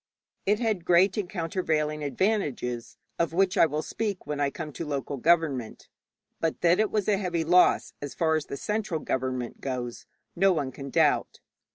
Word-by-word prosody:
It 205 Hz, +1 st, +4 dB
had 220 Hz, -7 st, 0 dB
great 180 Hz, +2 st, +4 dB
and 200 Hz, -5 st, -2 dB
countervailing 160 Hz, -4 st, -1 dB
advantages, 140 Hz, -, -1 dB, 0.2 s
of 170 Hz, -1 st, +1 dB
which 185 Hz, +1 st, +2 dB
I 165 Hz, -, +6 dB
will 155 Hz, +1 st, -2 dB
speak 210 Hz, -4 st, -3 dB
when 150 Hz, -1 st, -3 dB
I 140 Hz, -1 st, +2 dB
come 150 Hz, 0 st, -7 dB
to 150 Hz, -, -5 dB
local 140 Hz, -2 st, -3 dB
government, 145 Hz, -5 st, +1 dB, 0.5 s
but 165 Hz, -1 st, -1 dB
that 175 Hz, +2 st, +4 dB
it 215 Hz, -1 st, +3 dB
was 210 Hz, -3 st, -1 dB
a 205 Hz, -2 st, +3 dB
heavy 175 Hz, -4 st, -1 dB
loss 180 Hz, +3 st, +4 dB
as 145 Hz, -3 st, -6 dB
far 160 Hz, -1 st, +2 dB
as 155 Hz, -, -2 dB
the 140 Hz, -, -5 dB
central 210 Hz, -2 st, -2 dB
government 130 Hz, -3 st, -3 dB
goes 125 Hz, -3 st, -4 dB, 0.3 s
no 195 Hz, +2 st, +4 dB
one 140 Hz, -6 st, -2 dB
can 135 Hz, +2 st, -8 dB
doubt. -, -, +2 dB
160 Hz, 180 wpm, -27 LUFS, 140-185 Hz, 0.5 s, I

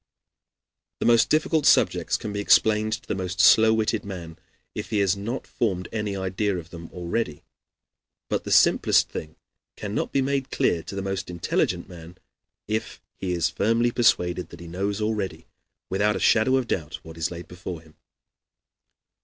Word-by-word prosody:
The -, -, 0 dB
most 115 Hz, -1 st, +5 dB
difficult 155 Hz, 0 st, +2 dB
subjects -, -, +3 dB
can 105 Hz, -, -6 dB
be 100 Hz, -, -3 dB
explained 110 Hz, +1 st, +3 dB
to -, -, -5 dB
the -, -, -1 dB
most 95 Hz, -1 st, -4 dB
slow 110 Hz, +2 st, +7 dB
witted 110 Hz, 0 st, 0 dB
man 85 Hz, -5 st, -8 dB, 0.3 s
if -, -, -5 dB
he 105 Hz, -, 0 dB
has 100 Hz, -1 st, +2 dB
not 115 Hz, +6 st, -4 dB
formed 95 Hz, -6 st, -2 dB
any 105 Hz, -2 st, -2 dB
idea 95 Hz, +1 st, -1 dB
of 85 Hz, -1 st, -9 dB
them 85 Hz, -1 st, -9 dB
already; 85 Hz, -2 st, -3 dB, 0.8 s
but -, -, -1 dB
the -, -, -5 dB
simplest -, -, +4 dB
thing 75 Hz, 0 st, -7 dB, 0.4 s
cannot 105 Hz, 0 st, -3 dB
be 135 Hz, -, +2 dB
made 135 Hz, 0 st, -1 dB
clear 85 Hz, -, +1 dB
to 100 Hz, -, -8 dB
the 100 Hz, -, -3 dB
most 95 Hz, -1 st, -3 dB
intelligent 85 Hz, -2 st, -1 dB
man 85 Hz, 0 st, -12 dB, 0.5 s
if 110 Hz, +1 st, -3 dB, 0.2 s
he 90 Hz, -2 st, -3 dB
is 85 Hz, -2 st, 0 dB
firmly 115 Hz, +3 st, +1 dB
persuaded 90 Hz, -7 st, +2 dB
that 85 Hz, -, -12 dB
he 85 Hz, -, -10 dB
knows 100 Hz, +4 st, -2 dB
already, 100 Hz, -7 st, -2 dB, 0.5 s
without 105 Hz, +2 st, +2 dB
a -, -, -2 dB
shadow 130 Hz, +4 st, +4 dB
of 130 Hz, -2 st, +1 dB
doubt, 80 Hz, -9 st, -3 dB
what 80 Hz, 0 st, -11 dB
is 80 Hz, -1 st, -1 dB
laid 85 Hz, 0 st, -8 dB
before 90 Hz, -2 st, -7 dB
him. 80 Hz, -1 st, -20 dB
100 Hz, 170 wpm, -25 LUFS, 90-110 Hz, 0.8 s, slow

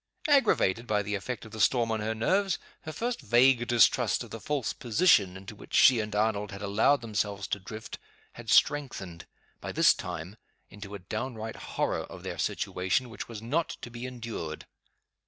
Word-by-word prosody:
Aggravated 205 Hz, -, +3 dB
by 105 Hz, -2 st, +1 dB
the 105 Hz, +1 st, -4 dB
effect 115 Hz, +5 st, -4 dB
of 110 Hz, -, -12 dB
the 110 Hz, -, -8 dB
storm 120 Hz, -3 st, +3 dB
on 110 Hz, -, 0 dB
her 110 Hz, +1 st, -2 dB
nerves, 190 Hz, -, +1 dB, 0.3 s
her 155 Hz, -, -4 dB
first 235 Hz, +10 st, -3 dB
vague 120 Hz, +1 st, +4 dB
distrust 120 Hz, -1 st, +3 dB
of -, -, -13 dB
the 115 Hz, -, -6 dB
false 145 Hz, 0 st, -2 dB
position 110 Hz, -, +3 dB
into 100 Hz, +2 st, -10 dB
which -, -, -8 dB
she 125 Hz, -3 st, +7 dB
and 105 Hz, -1 st, -3 dB
Arnold 105 Hz, -1 st, 0 dB
had 100 Hz, +1 st, -8 dB
allowed 110 Hz, +8 st, +3 dB
themselves 105 Hz, -3 st, -2 dB
to 100 Hz, -, -1 dB
drift 110 Hz, +3 st, -8 dB, 0.3 s
had -, -, -10 dB
strengthened, 100 Hz, -, +1 dB, 0.3 s
by -, -, -6 dB
this -, -, +5 dB
time, 90 Hz, +2 st, -7 dB, 0.3 s
into 105 Hz, 0 st, -9 dB
a 95 Hz, -2 st, -11 dB
downright 110 Hz, -1 st, -5 dB, 0.2 s
horror -, -, +1 dB
of -, -, -10 dB
their -, -, -5 dB
situation 95 Hz, +7 st, -1 dB
which 110 Hz, +1 st, -7 dB
was 110 Hz, -2 st, -8 dB
not 150 Hz, +8 st, -1 dB
to 120 Hz, -, -8 dB
be 120 Hz, +1 st, -6 dB
endured. 115 Hz, -11 st, -6 dB
110 Hz, 180 wpm, -29 LUFS, 100-125 Hz, 0.3 s, she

